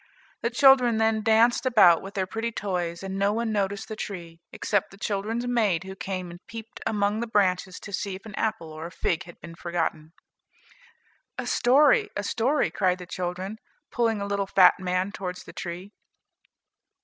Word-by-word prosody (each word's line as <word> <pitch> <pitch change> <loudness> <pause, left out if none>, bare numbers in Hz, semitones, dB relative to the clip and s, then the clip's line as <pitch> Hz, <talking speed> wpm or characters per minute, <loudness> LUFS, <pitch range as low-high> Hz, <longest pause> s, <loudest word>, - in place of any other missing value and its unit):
The 235 - 0
children 250 -2 +5
then 220 0 +2
danced 225 +2 +4
about 215 -10 +6
with 195 +1 -9
their 190 -1 0
pretty 225 +4 -3
toys, 180 -5 -3
and 195 0 -4
no 200 +1 +3
one 230 0 -1
noticed 200 -1 -1
the 220 - -5
tree, 170 -6 -7
except 205 -3 -1
the 195 - -15
children's 215 +4 -2
maid 215 -9 +1
who 190 0 -8
came 185 -2 -5
and 175 - -11
peeped 225 0 -9
among 210 -1 0
the 235 - -2
branches 190 -3 +1
to 200 - -9
see 195 0 -2
if 190 - -12
an 215 - -9
apple 215 -7 -2
or 160 +1 -6
a - - -12
fig 165 0 -1
had 175 - -14
been 170 - -10
forgotten. 165 -2 -3 1.2
"A - - -3
story, 275 +4 +4
a 205 - -2
story," 250 +8 +1
cried 185 -2 +1
the 180 - -9
children, 185 +4 -4 0.3
pulling 225 -3 +1
a 200 - -3
little 200 -1 -1
fat 185 -2 +6
man 185 +1 -1
towards 180 -3 -6
the - - -12
tree. 180 +3 -6
200 Hz, 185 wpm, -26 LUFS, 180-225 Hz, 1.2 s, about